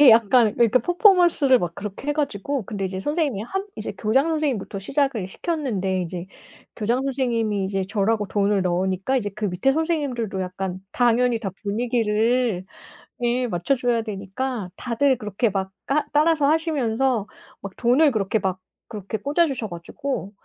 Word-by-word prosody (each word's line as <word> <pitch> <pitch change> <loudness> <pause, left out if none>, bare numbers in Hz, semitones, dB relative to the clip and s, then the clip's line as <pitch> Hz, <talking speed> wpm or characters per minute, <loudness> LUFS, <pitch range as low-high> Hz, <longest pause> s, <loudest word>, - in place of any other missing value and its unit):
예 285 -4 +9
약간 225 0 +5
그러니까 235 +1 +4
퍼포먼스를 350 - +4
막 170 -4 -3
그렇게 205 +7 -7
해 295 - +3
가지고 280 -3 -2
근데 195 0 -4
이제 190 0 -3
선생님이 295 - -1
한 385 - -4
이제 215 -1 -4
교장 265 +8 +2
선생님부터 290 -11 -1
시작을 260 -1 0
시켰는데 200 - -2
이제 175 +1 -5 0.5
교장 235 +4 0
선생님이 235 -7 0
이제 195 0 -1
절하고 210 +1 +1
돈을 200 -1 +1
넣으니까 185 +7 0
이제 215 -5 0
그 215 0 -2
밑에 190 +8 +1
선생님들도 280 - -1
약간 185 0 -4
당연히 245 -1 +2
다 200 -4 -3
분위기를 225 -1 +1 0.6
예 245 +1 +1
맞춰줘야 240 +5 0
되니까 210 +1 -4
다들 255 +2 +1
그렇게 210 +1 -1
막 190 -1 -3 0.2
까 295 +2 +1
따라서 305 0 +3
하시면서 270 -7 +1 0.4
막 195 -1 -8
돈을 265 +5 +4
그렇게 215 -1 0
막 190 -2 -2 0.3
그렇게 210 -1 -5
꽂아 295 - +2
주셔 250 -6 -3
가지고 190 +5 -5
230 Hz, 360 characters per minute, -23 LUFS, 195-270 Hz, 0.6 s, 예